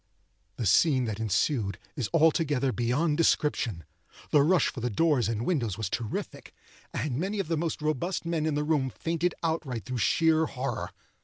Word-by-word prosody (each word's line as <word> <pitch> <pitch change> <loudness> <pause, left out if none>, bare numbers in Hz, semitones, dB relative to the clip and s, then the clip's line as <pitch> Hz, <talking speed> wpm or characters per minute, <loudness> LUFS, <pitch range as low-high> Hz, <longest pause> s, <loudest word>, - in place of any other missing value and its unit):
The 115 - -3
scene 130 - +4
that 110 -2 -4
ensued 110 - 0 0.2
is 125 -6 -2
altogether 150 -5 +2
beyond 135 +7 0
description. 135 - +1 0.5
The 145 - +6
rush 175 +5 +3
for - - -7
the 120 +1 -1
doors 130 -2 +2
and 115 +1 -2
windows 120 - 0
was 110 -4 -3
terrific, 115 -2 -5 0.4
and 140 -3 -2
many 195 +5 -2
of 195 - -2
the 165 - +1
most 160 -1 -2
robust 155 +5 -1
men 165 -2 -1
in 155 - 0
the 150 - 0
room 150 -4 +1
fainted 165 +6 -2
outright 155 -8 -2
through 130 -2 -3
sheer 160 +4 +3
horror. 125 -4 -4
145 Hz, 170 wpm, -28 LUFS, 120-160 Hz, 0.5 s, The